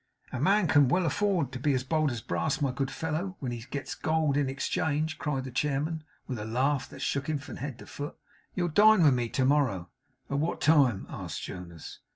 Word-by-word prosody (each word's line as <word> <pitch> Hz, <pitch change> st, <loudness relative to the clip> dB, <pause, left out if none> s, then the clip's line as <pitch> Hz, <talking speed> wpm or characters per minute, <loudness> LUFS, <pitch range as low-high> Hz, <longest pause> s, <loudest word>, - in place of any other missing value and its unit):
'A 130 Hz, -, -3 dB
man 195 Hz, +6 st, +3 dB
can 145 Hz, -3 st, +5 dB
well 180 Hz, +7 st, +2 dB
afford 170 Hz, -4 st, +1 dB
to 130 Hz, -, -5 dB
be 140 Hz, +1 st, +2 dB
as 130 Hz, -, 0 dB
bold 155 Hz, +3 st, +1 dB
as 120 Hz, -3 st, -4 dB
brass, 85 Hz, -, -1 dB
my 140 Hz, -3 st, +1 dB
good 135 Hz, +1 st, -2 dB
fellow, 160 Hz, +6 st, -3 dB
when 130 Hz, -3 st, -3 dB
he 120 Hz, -1 st, -5 dB
gets 140 Hz, 0 st, -4 dB
gold 155 Hz, -3 st, +1 dB
in 140 Hz, -2 st, +1 dB
exchange!' 150 Hz, +3 st, -1 dB
cried 135 Hz, -4 st, -1 dB
the 130 Hz, -, -6 dB
chairman, 150 Hz, +4 st, -1 dB, 0.2 s
with 125 Hz, -4 st, -4 dB
a -, -, -4 dB
laugh 130 Hz, +5 st, 0 dB
that -, -, -8 dB
shook 140 Hz, +2 st, -1 dB
him 155 Hz, -, +1 dB
from 145 Hz, -, -8 dB
head 135 Hz, -2 st, -5 dB
to -, -, -11 dB
foot. 145 Hz, +1 st, -7 dB, 0.4 s
'You'll 175 Hz, -2 st, 0 dB
dine 210 Hz, +3 st, +6 dB
with 145 Hz, -4 st, +6 dB
me 120 Hz, -2 st, 0 dB
to 130 Hz, -, +1 dB
morrow?' 130 Hz, -11 st, +2 dB, 0.4 s
'At 140 Hz, -, -1 dB
what 160 Hz, +3 st, -1 dB
time?' 140 Hz, -10 st, +4 dB
asked -, -, -6 dB
Jonas. 85 Hz, -3 st, -8 dB
140 Hz, 215 wpm, -29 LUFS, 130-155 Hz, 0.4 s, dine